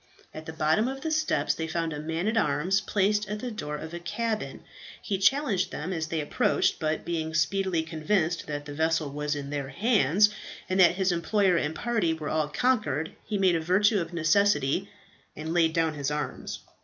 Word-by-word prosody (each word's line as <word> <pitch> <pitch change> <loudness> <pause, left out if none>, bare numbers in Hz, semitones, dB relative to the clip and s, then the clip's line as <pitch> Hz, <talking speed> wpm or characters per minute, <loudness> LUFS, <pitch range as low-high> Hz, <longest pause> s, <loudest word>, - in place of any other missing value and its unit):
At 155 0 -9
the 160 - -6
bottom 160 +8 +2
of 270 +1 -5
the 320 - -2
steps 310 0 +1
they 160 - -4
found 165 0 -2
a 150 - -5
man 160 +5 -2
at 220 - +1
arms 190 -2 +1
placed 205 +1 +1
at 210 - -2
the 245 +2 -4
door 150 -9 -5
of 160 +2 -8
a 175 - -4
cabin. 220 +5 -3 0.4
He 195 -3 -3
challenged 220 -2 +2
them 170 +6 -4
as 160 -2 -2
they 160 0 -2
approached, 145 - +1
but 155 -1 -1
being 160 -2 -2
speedily 170 +1 +1
convinced 165 +1 -1
that 145 -1 -4
the 145 - -7
vessel 160 -1 0
was 150 +1 -2
in 140 -1 -6
their 140 -2 -3
hands, 205 - +3 0.4
and 185 +1 0
that 175 -1 +6
his 190 -1 +1
employer 185 +2 +2
and 160 -1 -1
party 215 -6 0
were 155 -2 -5
all 155 -1 0
conquered, 160 - 0
he 210 - -2
made 190 -2 +3
a 165 - 0
virtue 200 +5 +3
of 165 0 -5
necessity, 170 0 +2 0.5
and 160 +2 -4
laid 165 -2 +3
down 160 -1 +1
his 140 -2 -2
arms. 150 0 -4
170 Hz, 200 wpm, -27 LUFS, 155-200 Hz, 0.5 s, that